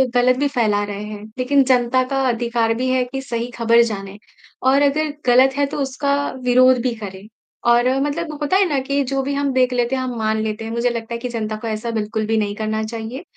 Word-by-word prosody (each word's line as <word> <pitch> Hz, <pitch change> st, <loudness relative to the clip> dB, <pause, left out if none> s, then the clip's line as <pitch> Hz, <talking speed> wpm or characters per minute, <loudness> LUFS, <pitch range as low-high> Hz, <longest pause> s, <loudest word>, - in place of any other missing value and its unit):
गलत 250 Hz, +1 st, +4 dB
भी 285 Hz, -, +2 dB
फैला 220 Hz, -7 st, +1 dB
रहे 205 Hz, 0 st, -5 dB
हैं, 210 Hz, 0 st, -8 dB
लेकिन 270 Hz, +2 st, +3 dB
जनता 255 Hz, 0 st, +2 dB
का 270 Hz, 0 st, -1 dB
अधिकार 235 Hz, -1 st, 0 dB
भी 255 Hz, +3 st, -2 dB
है 255 Hz, 0 st, +2 dB
कि 270 Hz, +2 st, -5 dB
सही 235 Hz, -2 st, -4 dB
खबर 230 Hz, 0 st, +4 dB
जाने 200 Hz, -3 st, -5 dB, 0.5 s
और 265 Hz, +2 st, +4 dB
अगर 290 Hz, +1 st, +1 dB
गलत 255 Hz, +2 st, +5 dB
है, 285 Hz, -, +3 dB
तो 280 Hz, -, -5 dB
उसका 280 Hz, +1 st, 0 dB, 0.3 s
विरोध 255 Hz, +1 st, +5 dB
भी 250 Hz, 0 st, 0 dB
करें, 200 Hz, -2 st, -9 dB, 0.4 s
और 240 Hz, +1 st, +4 dB
मतलब 305 Hz, +3 st, -2 dB
होता 295 Hz, +6 st, +2 dB
है 395 Hz, -, +4 dB
ना 280 Hz, -, +1 dB
कि 280 Hz, +1 st, 0 dB
जो 270 Hz, +1 st, -1 dB
भी 280 Hz, +1 st, -2 dB
हम 280 Hz, 0 st, 0 dB
देख 255 Hz, -1 st, +2 dB
लेते 245 Hz, +1 st, 0 dB
हैं, 260 Hz, -, -2 dB
हम 250 Hz, -1 st, -4 dB
मान 220 Hz, 0 st, 0 dB
लेते 220 Hz, 0 st, -4 dB
हैं। 225 Hz, -, -5 dB
मुझे 235 Hz, +1 st, 0 dB
लगता 235 Hz, -1 st, -5 dB
है -, -, -2 dB
कि 250 Hz, -, -4 dB
जनता 220 Hz, -2 st, -3 dB
को 230 Hz, -, -4 dB
ऐसा 220 Hz, +1 st, -3 dB
बिल्कुल 220 Hz, 0 st, -2 dB
भी 225 Hz, +1 st, 0 dB
नहीं 205 Hz, -1 st, -1 dB
करना 215 Hz, 0 st, -2 dB
चाहिए। 230 Hz, +6 st, -6 dB
245 Hz, 235 wpm, -20 LUFS, 220-265 Hz, 0.5 s, गलत